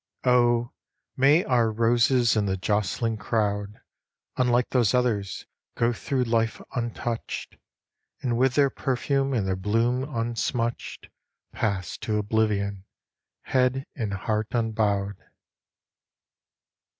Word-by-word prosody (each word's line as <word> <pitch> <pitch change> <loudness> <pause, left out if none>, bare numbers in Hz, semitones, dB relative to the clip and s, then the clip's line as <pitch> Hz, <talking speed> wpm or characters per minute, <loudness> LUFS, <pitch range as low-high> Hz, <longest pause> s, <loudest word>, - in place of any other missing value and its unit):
Oh, 120 -1 +3 0.4
may 145 +6 +5
our 120 -3 +3
roses 120 +2 +3
in 105 -2 +1
the 95 0 0
jostling 105 +3 -1
crowd, 105 -1 -1 0.6
Unlike 125 -1 +2
those 120 -4 +3
others, 110 -6 0 0.3
go 120 +1 +2
through 130 +3 -1
life 115 -1 0 0.2
untouched, 120 -1 -4 0.7
And 120 -3 0
with 130 +1 +2
their 140 -2 +4
perfume 135 +1 0
and 115 -7 0
their 95 - 0
bloom 115 +6 +1
unsmutched 120 -2 -3 0.4
Pass 100 -6 -2
to 105 -1 -1
oblivion, 100 -2 0 0.6
head 130 +1 +1
and 110 -7 -3
heart 105 +2 -1
unbowed. 105 -4 0
115 Hz, 105 wpm, -26 LUFS, 105-125 Hz, 0.7 s, may